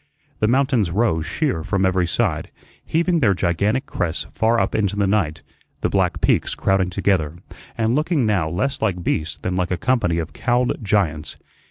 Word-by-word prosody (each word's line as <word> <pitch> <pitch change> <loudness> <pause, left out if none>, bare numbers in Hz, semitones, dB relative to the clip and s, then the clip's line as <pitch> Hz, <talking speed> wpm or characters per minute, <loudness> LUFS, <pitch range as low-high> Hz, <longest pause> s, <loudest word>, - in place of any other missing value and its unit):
The 110 - +2
mountains 130 - +2
rose 85 -4 0
sheer 135 - -1
from 95 +1 0
every 95 -1 +2
side, - - -1 0.3
heaving 170 +1 +1
their 100 -9 +3
gigantic 100 - 0
crests 85 -8 -3
far 115 +1 +2
up - - 0
into 100 -2 0
the 100 -1 +1
night, 90 -6 0 0.4
the - - +1
black - - +1
peaks - - +2
crowding 95 -2 +1
together, 90 -4 0 0.4
and 115 0 +1
looking 150 -1 +1
now 95 -7 +1
less 135 - -2
like 90 -5 -1
beasts 80 -1 -1
than 90 +4 -3
like 90 -1 0
a 90 - -1
company 115 -9 +1
of 80 -3 -4
cowled 120 +3 0
giants. 80 -7 0
100 Hz, 175 wpm, -21 LUFS, 85-120 Hz, 0.4 s, their